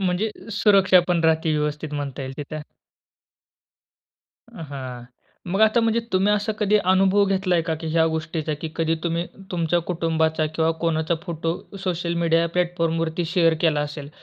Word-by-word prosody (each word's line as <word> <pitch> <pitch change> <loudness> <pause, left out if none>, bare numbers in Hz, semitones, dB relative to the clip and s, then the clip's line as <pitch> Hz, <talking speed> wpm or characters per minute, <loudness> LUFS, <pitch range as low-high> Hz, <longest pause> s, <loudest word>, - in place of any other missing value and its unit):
म्हणजे 190 +3 0 0.2
सुरक्षा 195 -3 +5
पण 175 -2 +2
राहते, 160 0 +2
व्यवस्थित 150 0 -2
म्हणता 140 -2 -4
येईल 130 0 -5
तिथे. 150 +1 -6 1.9
हां, 130 -6 -7 0.5
मग 195 +3 0
आता 220 +2 +5
म्हणजे 230 0 +2
तुम्ही 190 +2 +3
असा 210 +1 0
कधी 210 0 +3 0.2
अनुभव 195 +2 +4
घेतलाय 185 -3 +1
का, 160 -1 -2
की 160 +1 -7
ह्या 160 0 +3
गोष्टीचा 160 -1 -2
की 160 - -4
कधी 165 0 +1
तुम्ही 170 0 -1 0.2
तुमच्या 175 -1 +1
कुटुंबाचा 160 -2 0
किंवा 160 0 +2
कोणाचा 165 0 0
फोटो 165 -1 -3 0.3
सोशल 175 -1 -1
मीडिया 165 0 +3
प्लॅटफॉर्मवरती 165 -1 0
शेअर 165 -1 +3
केला 155 -3 +2
असेल 145 -1 -5
165 Hz, 150 wpm, -23 LUFS, 160-180 Hz, 1.9 s, सुरक्षा